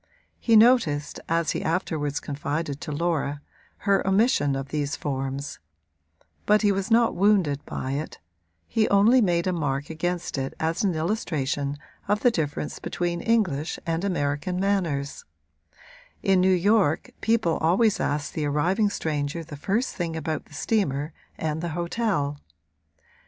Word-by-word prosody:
He 230 - +3
noticed, 215 - +4
as 165 0 +1
he - - -2
afterwards 155 -4 -1
confided 145 0 -3
to - - -5
Laura, 145 -2 -1 0.5
her 200 -1 +4
omission 190 - +3
of 135 0 -4
these 145 -2 -1
forms; 135 0 -4 0.9
but 210 +1 +4
he 205 - +4
was 195 +1 -2
not 230 0 +4
wounded 185 -8 +2
by 130 - -4
it 145 +3 -4 0.5
he 220 -1 +1
only 215 +6 +5
made 175 -4 +2
a 185 - +1
mark 145 -3 -2
against 175 -2 -2
it 135 0 -4
as 160 +4 0
an 190 -4 +1
illustration 150 - -1 0.3
of 205 +1 +1
the 245 - +5
difference 150 -6 -3
between 175 -1 -2
English 190 - +1
and 165 +1 -1
American 180 0 -1
manners: 175 -8 -1 1.0
in 190 -2 +4
New 185 - +4
York 185 -2 +2
people 220 -8 +2
always 190 +7 +2
asked 145 0 -1
the 150 -2 -1
arriving 180 +9 +2
stranger 155 -2 -2
the 155 -2 -9
first 205 - -1
thing 170 -3 -3
about 160 -1 -3
the 145 - -15
steamer 150 -7 0 0.2
and 160 0 -2
the 170 - -2
hotel. 170 -6 -1
165 Hz, 145 wpm, -25 LUFS, 145-200 Hz, 1.0 s, only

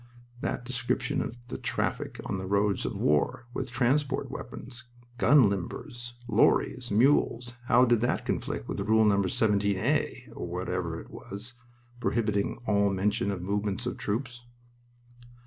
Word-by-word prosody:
That 125 - -3
description 125 0 -1
of 120 +1 -7
the - - -5
traffic - - -2
on 95 - -2
the 95 - -5
roads 100 0 +1
of - - -4
war, 75 +10 +1
with - - -3
transport 130 +4 +1
wagons, 125 -1 -8 0.3
gun 145 -6 +6
limbers, 120 +5 -4
lorries, 120 +2 +3
mules 120 +1 +3
how 125 +1 +5
did 120 -2 +3
that 120 - 0
conflict - - -2
with - - -3
Rule 110 0 +4
No. 100 -2 +4
17a 100 0 +1
(or - - -5
whatever 90 -1 -3
it - - -12
was) 105 +5 -8 0.5
prohibiting 105 -5 0
all 100 -2 +3
mention 100 +1 0
of 95 -3 -3
movements 100 +1 -1
of - - -3
troops? 120 +3 -3
105 Hz, 140 wpm, -28 LUFS, 100-120 Hz, 0.5 s, gun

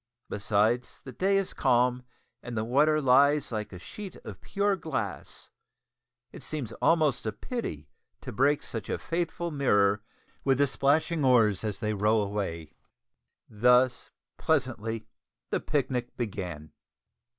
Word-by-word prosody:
Besides, 110 +4 0
the 130 - -8
day 195 +10 +1
is 195 -1 -1
calm 125 -1 +2 0.4
and 120 -2 -6
the 110 - 0
water 150 +6 +3
lies 140 +1 +4
like 105 -2 -4
a 95 - -8
sheet 195 - -9
of - - -9
pure 200 0 0
glass; 115 - -5 0.8
it - - -11
seems 140 -8 -5
almost 155 -8 +2
a - - 0
pity 105 - -5 0.3
to - - -7
break 140 +6 +2
such 115 - -6
a - - -1
faithful 170 0 -3
mirror 105 -8 +2 0.4
with 135 -2 +3
the 145 - +4
plashing 150 +4 +1
oars 115 -7 +4
as 105 -2 -3
they 110 -1 0
row 105 +2 +2
away. 100 -6 -3 0.7
Thus, 125 +3 +3 0.3
pleasantly, 115 -7 -1 0.5
the - - +1
picnic 125 -4 -2
began! 90 - -5
125 Hz, 135 wpm, -28 LUFS, 105-145 Hz, 0.8 s, lies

